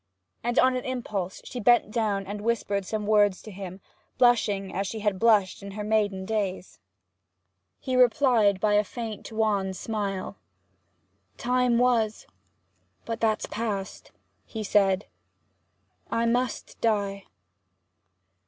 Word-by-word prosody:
And 240 +1 -1
on 255 0 +5
an 255 - -2
impulse 210 -8 -4
she 250 - -6
bent 240 -1 +4
down 210 -4 0
and 205 +2 -6
whispered 205 -4 -1
some 215 -1 -3
words 205 -2 +3
to 215 - -9
him, 190 -1 -8 0.4
blushing 210 -6 +2
as 195 +1 -2
she 220 +2 -5
had 205 -3 0
blushed 215 -4 +3
in 200 0 -8
her 210 +1 -5
maiden 205 -3 0
days. 195 -3 -3 1.0
He 255 - -2
replied 245 -6 +4
by 210 +2 +2
a 210 0 +4
faint 225 0 -7
wan 210 -3 0
smile. 200 -2 -4 1.0
'Time 250 -1 +2
was!... 235 -3 +1 0.8
but 230 0 -4
that's 220 -1 +1
past!' 205 -3 -4 0.3
he 220 -2 -6
said, 195 -1 +2 1.0
'I 230 - 0
must 245 +1 -1
die!' 200 -3 0
215 Hz, 125 wpm, -26 LUFS, 200-230 Hz, 1.0 s, on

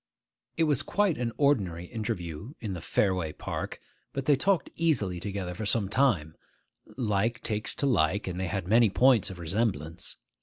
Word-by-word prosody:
It 165 - +3
was 145 -4 +3
quite 195 0 +1
an 120 -1 -1
ordinary 100 - +2
interview 105 - -5
in 105 -4 -4
the 90 - -5
Fareway 90 -4 0
Park - - -4 0.3
but 135 -1 -3
they 145 - +5
talked 190 +6 +1
easily 115 - +1
together 95 -1 -4
for 105 +4 -4
some 105 -3 +2
time: 100 - +2 0.6
like 115 0 0
takes 105 -1 -2
to - - -1
like, 100 - +2
and 90 -1 -4
they 95 - -1
had 95 -1 -3
many 115 +2 +5
points 125 +2 +4
of 95 - -8
resemblance. 85 -2 -2
105 Hz, 165 wpm, -28 LUFS, 90-130 Hz, 0.6 s, they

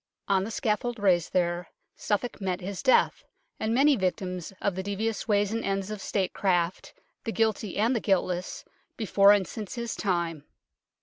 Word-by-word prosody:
On 195 -1 +3
the 210 - -4
scaffold 235 0 -1
raised 185 -5 +2
there 175 -1 0 0.3
Suffolk 215 +2 -2
met 185 -2 -1
his 195 0 -5
death, 260 - +3 0.4
and 220 - -1
many 275 +4 +5
victims 185 -3 -2
of 200 - 0
the 190 - -3
devious 205 +3 -2
ways 205 -1 +2
and 230 +1 -2
ends 195 +1 -2
of 210 -2 -5
statecraft, 185 -3 -1 0.3
the 225 - -2
guilty 220 -3 0
and 230 +5 +2
the - - +1
guiltless, 185 -3 -1 0.3
before 200 -3 +5
and 200 -3 +3
since 215 0 -7
Ms 235 -1 -3
time. 170 -6 -1
200 Hz, 165 wpm, -27 LUFS, 185-220 Hz, 0.4 s, many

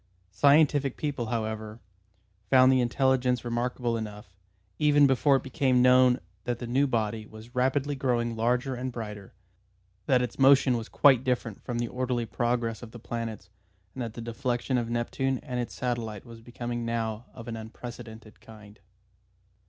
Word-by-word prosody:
Scientific 140 +4 +3
people, 140 -6 -3
however, 110 -1 -4 0.7
found 130 +1 +6
the 130 -1 +3
intelligence 125 0 +1
remarkable 120 0 -1
enough, 105 -4 -7 0.4
even 145 -1 +5
before 135 +1 +4
it 135 - 0
became 130 -1 +2
known 125 0 +5 0.3
that 120 -1 -1
the 120 - -6
new 135 +4 +2
body 110 -3 -2
was 110 +3 -13
rapidly 135 +3 +1
growing 120 -4 -1
larger 125 +4 0
and 130 +1 -4
brighter, 105 -5 -8 0.7
that 125 -2 +3
its 125 +1 -5
motion 135 -1 +5
was 115 -2 -5
quite 135 -4 +5
different 125 -5 -2
from 120 - -4
the 120 0 -1
orderly 125 -1 -2
progress 115 +1 -1
of 120 - -9
the 120 - -11
planets, 115 -3 -6 0.4
and 130 - -6
that 115 -2 -5
the 115 - -6
deflection 120 +2 -1
of 115 -1 -3
Neptune 130 +3 -1
and 125 -3 -4
its 120 - -4
satellite 115 -5 -3
was 115 -1 -12
becoming 120 0 -5
now 115 -1 -3
of 115 -2 -11
an 115 - -4
unprecedented 110 0 -10
kind. 105 -2 -14
120 Hz, 160 wpm, -28 LUFS, 115-130 Hz, 0.7 s, found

